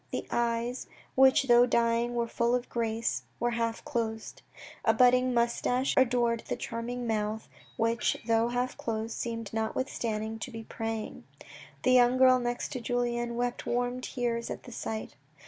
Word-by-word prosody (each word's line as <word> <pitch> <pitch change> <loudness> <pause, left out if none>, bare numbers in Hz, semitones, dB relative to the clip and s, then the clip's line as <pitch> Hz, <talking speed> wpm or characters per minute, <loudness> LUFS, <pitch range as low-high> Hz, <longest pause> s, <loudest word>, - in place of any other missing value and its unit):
The - - -3
eyes, 235 +1 -1 0.3
which 265 +1 +5
though 245 -1 +6
dying 235 0 +1
were 235 -1 0
full 235 +1 +1
of 250 0 -3
grace, 230 -1 -1 0.2
were 240 0 +1
half 230 +1 -2
closed. 225 -6 -3 0.4
A - - +3
budding 255 0 +5
moustache 245 +2 +1
adored 240 -2 +3
that - - -1
charming 240 +2 -4
mouth 220 -1 -2 0.3
which, 230 0 +1
though 230 0 +3
half 245 +1 -1
closed, 225 0 -3
seemed 230 -3 -4
notwithstanding 220 -1 -2
to 240 - -5
be 225 -2 -7
praying. 225 -1 -5 0.6
The 255 - +3
young 250 0 +5
girl 255 -1 +6
next 240 0 -2
to 255 -4 -5
Julien 240 0 -1
wept 245 0 -2
warm 245 +1 -1
tears 240 -2 -2
at - - -6
the 245 - -11
sight. 220 -2 -5
235 Hz, 155 wpm, -29 LUFS, 230-245 Hz, 0.6 s, though